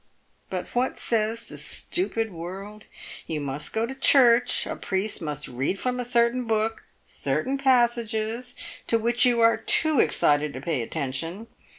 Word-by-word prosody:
But 185 Hz, -1 st, -3 dB
what 250 Hz, +1 st, -1 dB
says 225 Hz, 0 st, 0 dB
the -, -, -9 dB
stupid 225 Hz, -, -1 dB
world? 195 Hz, +5 st, -8 dB, 0.4 s
You 160 Hz, -2 st, -3 dB
must 140 Hz, 0 st, -2 dB
go 220 Hz, +1 st, 0 dB
to 255 Hz, -, -6 dB
church, 250 Hz, -3 st, +5 dB
a -, -, -4 dB
priest 190 Hz, +2 st, -2 dB
must 150 Hz, -3 st, -4 dB
read 135 Hz, +10 st, -2 dB
from 250 Hz, +4 st, -2 dB
a 245 Hz, -, -2 dB
certain 240 Hz, +1 st, +2 dB
book 225 Hz, 0 st, -1 dB, 0.2 s
certain 265 Hz, +2 st, -2 dB
passages 240 Hz, -2 st, +1 dB, 0.3 s
to 230 Hz, -, +2 dB
which 240 Hz, +3 st, +2 dB
you 240 Hz, -1 st, +2 dB
are 230 Hz, 0 st, +5 dB
too 310 Hz, -4 st, +1 dB
excited 150 Hz, -1 st, +2 dB
to 130 Hz, -, -6 dB
pay 145 Hz, -2 st, -2 dB
attention. 160 Hz, -, -4 dB
225 Hz, 155 wpm, -25 LUFS, 165-240 Hz, 0.4 s, church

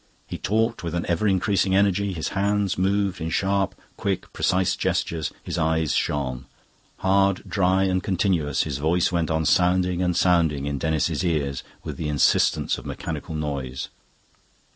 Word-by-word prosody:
He -, -, -7 dB
talked 115 Hz, +2 st, 0 dB
with 85 Hz, 0 st, -3 dB
an 85 Hz, -, -1 dB
ever 85 Hz, +5 st, +1 dB
increasing 95 Hz, 0 st, +2 dB
energy, 100 Hz, 0 st, +2 dB
his 80 Hz, -4 st, -3 dB
hands 100 Hz, 0 st, 0 dB
moved 95 Hz, -1 st, 0 dB
in 80 Hz, -, -2 dB
sharp, 95 Hz, +3 st, 0 dB, 0.2 s
quick, 100 Hz, -2 st, -3 dB
precise 90 Hz, 0 st, +1 dB
gestures, 80 Hz, -3 st, -1 dB
his -, -, -3 dB
eyes 80 Hz, -1 st, +1 dB
shone. 65 Hz, -3 st, -1 dB, 0.5 s
Hard, 95 Hz, 0 st, +2 dB
dry, 95 Hz, 0 st, +2 dB
and 95 Hz, -1 st, +1 dB
continuous, 90 Hz, -7 st, 0 dB
his 70 Hz, -3 st, -4 dB
voice 80 Hz, +4 st, +2 dB
went 85 Hz, -3 st, 0 dB
on 80 Hz, 0 st, 0 dB
sounding 90 Hz, +1 st, +2 dB
and 90 Hz, -2 st, +1 dB
sounding 80 Hz, -6 st, +2 dB
in 70 Hz, -1 st, -2 dB
Denis's 80 Hz, +2 st, 0 dB
ears 75 Hz, -6 st, -1 dB, 0.2 s
with -, -, -6 dB
the 75 Hz, -, -3 dB
insistence 75 Hz, -2 st, +2 dB
of -, -, -13 dB
a -, -, -6 dB
mechanical 80 Hz, -, -5 dB
noise. 70 Hz, -4 st, -4 dB
90 Hz, 160 wpm, -24 LUFS, 80-95 Hz, 0.5 s, increasing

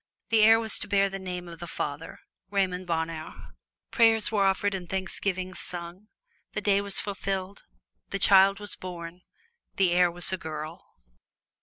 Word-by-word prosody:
The 225 Hz, -1 st, +4 dB
heir 225 Hz, +1 st, +7 dB
was 220 Hz, -2 st, -1 dB
to -, -, 0 dB
bear 200 Hz, 0 st, +3 dB
the 195 Hz, 0 st, -6 dB
name 180 Hz, -1 st, -5 dB
of 170 Hz, -1 st, -10 dB
the 175 Hz, -, -7 dB
father 145 Hz, 0 st, -5 dB, 0.3 s
Raymond 185 Hz, -2 st, -1 dB
Bonheur. 160 Hz, -1 st, -4 dB, 0.4 s
Prayers 225 Hz, -2 st, +4 dB
were 205 Hz, -3 st, +2 dB
offered 195 Hz, +1 st, +1 dB
and 180 Hz, -3 st, -5 dB
thanksgivings 185 Hz, -1 st, -2 dB
sung. 175 Hz, +3 st, -7 dB, 0.5 s
The 210 Hz, -, -2 dB
days 200 Hz, -1 st, +3 dB
were 200 Hz, -, -7 dB
fulfilled. 195 Hz, -1 st, -3 dB, 0.4 s
The 195 Hz, -, -2 dB
child 195 Hz, 0 st, +6 dB
was 205 Hz, -2 st, -4 dB
born. 175 Hz, -1 st, -8 dB, 0.5 s
The 190 Hz, -3 st, +3 dB
heir 175 Hz, 0 st, +4 dB
was 175 Hz, +2 st, +1 dB
a 185 Hz, -, -2 dB
girl. 155 Hz, 0 st, -7 dB
190 Hz, 160 wpm, -27 LUFS, 175-200 Hz, 0.5 s, heir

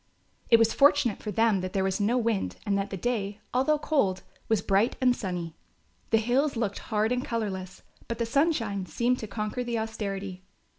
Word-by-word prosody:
It 230 Hz, -, +8 dB
was 225 Hz, 0 st, +3 dB
fortunate 280 Hz, -5 st, +4 dB
for 215 Hz, -, -5 dB
them 215 Hz, -1 st, +2 dB
that 185 Hz, 0 st, -5 dB
there 195 Hz, -, +1 dB
was 190 Hz, +1 st, 0 dB
no 225 Hz, +5 st, +2 dB
wind 225 Hz, -4 st, 0 dB
and 200 Hz, -2 st, +1 dB
that 200 Hz, 0 st, -1 dB
the 195 Hz, -, -4 dB
day, 210 Hz, -2 st, -2 dB
although 270 Hz, +5 st, +3 dB
cold, 210 Hz, -12 st, 0 dB, 0.3 s
was 220 Hz, -3 st, +2 dB
bright 200 Hz, +5 st, +2 dB
and 250 Hz, -1 st, +3 dB
sunny. 175 Hz, -6 st, -4 dB, 0.6 s
The 225 Hz, -, +4 dB
hills 250 Hz, +6 st, +1 dB
looked 220 Hz, -4 st, -2 dB
hard 215 Hz, +1 st, +1 dB
and 250 Hz, 0 st, 0 dB
colourless, 190 Hz, -5 st, -4 dB, 0.2 s
but 235 Hz, -, -3 dB
the 235 Hz, -, 0 dB
sunshine 230 Hz, -, 0 dB
seemed 245 Hz, +1 st, 0 dB
to 220 Hz, -, -5 dB
conquer 215 Hz, +4 st, -3 dB
the 240 Hz, -1 st, -2 dB
austerity. 200 Hz, -4 st, -4 dB
220 Hz, 190 wpm, -28 LUFS, 195-245 Hz, 0.6 s, It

